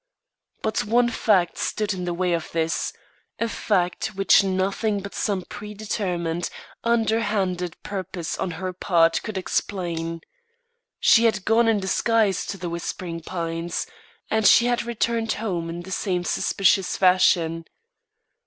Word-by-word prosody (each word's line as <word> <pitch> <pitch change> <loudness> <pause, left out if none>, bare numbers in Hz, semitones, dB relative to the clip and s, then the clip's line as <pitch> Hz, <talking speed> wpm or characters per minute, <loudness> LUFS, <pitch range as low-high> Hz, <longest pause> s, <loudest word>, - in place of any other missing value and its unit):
But 220 0 0
one 240 +3 +3
fact 195 -6 +2
stood 215 -1 -1
in 180 -1 -4
the 175 - -1
way 180 0 0
of 165 -1 -3
this 165 -1 0 0.5
a 230 - +1
fact 190 -1 -1
which 195 +1 +5
nothing 195 +2 0
but 200 +1 -8
some 195 -4 -1
predetermined, 195 -5 -3 0.3
underhanded 215 -6 0
purpose 185 -4 -4
on 190 - -1
her 185 0 -4
part 170 -2 +2
could 215 -3 -5
explain. 170 -3 -2 0.8
She 230 0 +5
had 215 -4 +1
gone 225 +1 +4
in 220 -2 +3
disguise 200 0 +1
to 200 - -4
The 180 - -5
Whispering 170 0 -5
Pines, 165 0 -3 0.5
and 220 -1 +3
she 235 - +7
had 245 0 +1
returned 230 -1 0
home 180 -6 -3
in 170 +1 -5
the 190 - -10
same 180 -2 -1
suspicious 195 +1 +2
fashion. 170 -3 +3
190 Hz, 135 wpm, -24 LUFS, 175-215 Hz, 0.8 s, she